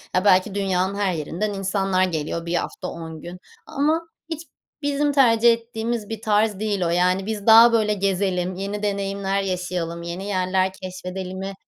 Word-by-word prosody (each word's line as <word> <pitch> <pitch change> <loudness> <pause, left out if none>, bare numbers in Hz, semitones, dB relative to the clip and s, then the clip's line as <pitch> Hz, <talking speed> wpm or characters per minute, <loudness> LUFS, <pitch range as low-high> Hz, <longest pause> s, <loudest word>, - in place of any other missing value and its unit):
ya 185 +2 +2
belki 190 +1 +4
dünyanın 190 -1 0
her 200 -2 0
yerinden 175 +6 -3
insanlar 195 -1 0
geliyor 165 -1 -2
1 170 - -3
hafta 180 - -3
10 160 -2 -7
gün 175 +1 -8 0.3
ama 315 +2 0 0.2
hiç 320 -2 -4 0.4
bizim 290 0 +1
tercih 235 -4 +5
ettiğimiz 230 -1 -4
bir 225 -1 -5
tarz 210 -2 +1
değil 210 -2 -1
o - - 0
yani. 180 +2 +2
Biz 210 -1 -4
daha 230 +1 +9
böyle 215 -2 +3
gezelim 190 -2 -1
yeni 200 +2 -4
deneyimler 200 -1 -1
yaşayalım 180 -3 -3
yeni 175 +3 -5
yerler 185 -1 0
keşfedelimi 185 +1 -6
195 Hz, 160 wpm, -23 LUFS, 185-215 Hz, 0.4 s, daha